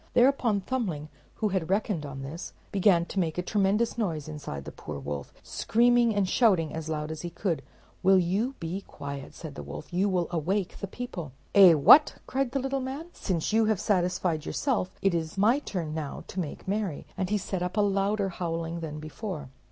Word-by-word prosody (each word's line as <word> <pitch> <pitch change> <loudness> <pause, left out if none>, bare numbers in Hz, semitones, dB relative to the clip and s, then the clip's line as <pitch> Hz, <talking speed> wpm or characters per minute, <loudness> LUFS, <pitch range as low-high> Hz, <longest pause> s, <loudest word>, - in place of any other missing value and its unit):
Thereupon 240 -5 +4
Thumbling, 185 - -2 0.3
who 215 - 0
had 185 -4 -1
reckoned 195 -6 0
on 135 -1 -7
this, 160 +7 -7 0.2
began 185 -3 +4
to 195 - -3
make 165 -3 0
a 180 - 0
tremendous 210 +4 +1
noise 160 -9 -1
inside 140 - -6
the - - -6
poor - - -7
wolf, 70 0 -5
screaming 240 -1 +3
and 200 -2 +2
shouting 180 -9 +3
as 160 0 -5
loud 150 0 -2
as 160 -1 -5
he 175 - -4
could. 170 -3 -2 0.4
"Will 190 +1 +6
you 200 +9 +1
be 170 +4 -3
quiet?" 140 -1 -7
said 160 -4 -8
the - - -7
wolf; - - -8
"you 190 +3 +2
will 180 -3 +1
awake 180 +4 -1
the 200 - -4
people." 180 - -6 0.2
"Eh, 190 -4 +9
what!" 280 - +8
cried 270 0 0
the 275 - -2
little 270 +1 -1
man, 275 +6 -5
"since 180 +2 -2
you 225 0 +4
have 215 -3 +1
satisfied 180 -4 +1
yourself, 230 - -1
it 195 -2 +3
is 165 +1 -2
my 225 +8 +4
turn 175 - -4
now 155 -3 -4
to 190 - -4
make 165 0 -5
merry;" 195 -6 -2
and 185 -1 -2
he 210 - +2
set 190 -2 -3
up 180 +3 -3
a - - +5
louder 200 0 +1
howling 170 -1 -3
than 155 -2 -5
before. 155 - -6
185 Hz, 200 wpm, -28 LUFS, 160-210 Hz, 0.4 s, Eh